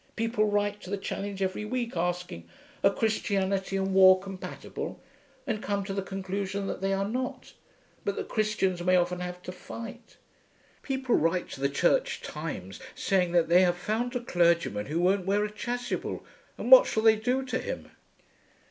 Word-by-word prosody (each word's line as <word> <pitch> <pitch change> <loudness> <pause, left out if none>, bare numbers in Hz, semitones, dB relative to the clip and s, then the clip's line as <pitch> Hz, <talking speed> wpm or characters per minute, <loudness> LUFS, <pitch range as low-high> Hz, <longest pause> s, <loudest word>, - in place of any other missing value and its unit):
People 225 -1 +1
write 205 0 0
to 180 - -10
the 200 - -1
Challenge 195 0 -4
every 190 +2 -2
week 235 0 -3
asking 175 - -3 0.3
'Are 195 - +6
Christianity 195 -3 0
and 195 0 -1
War 185 0 +8
compatible?' 195 -1 -7 0.5
and 220 -6 -2
come 200 -1 -1
to 195 0 -4
the 195 - -1
conclusion 195 +1 -3
that - - -4
they 195 0 0
are 195 0 0
not, 255 +3 -4 0.5
but 200 - -1
that - - -4
Christians 210 -5 0
may 185 +1 +3
often 180 0 +1
have 180 0 -6
to - - -6
fight. 230 +5 -9 0.6
People 265 -3 -1
write 165 +3 +1
to 135 - -8
the 140 - +2
Church - - +1
Times - - -6 0.2
saying 185 -3 +1
that 170 -2 +4
they 175 +2 +6
have 175 -1 +3
found 230 +7 -2
a 250 - -1
clergyman 170 - +1
who 155 +4 -1
won't 185 +1 +2
wear 205 +2 +2
a 210 - -5
chasuble, 245 +3 -4 0.3
and - - -4
what - - +10
shall 220 - 0
they 220 -1 +7
do 250 +4 0
to 255 -1 -2
him? - - -6
195 Hz, 175 wpm, -28 LUFS, 180-220 Hz, 0.6 s, what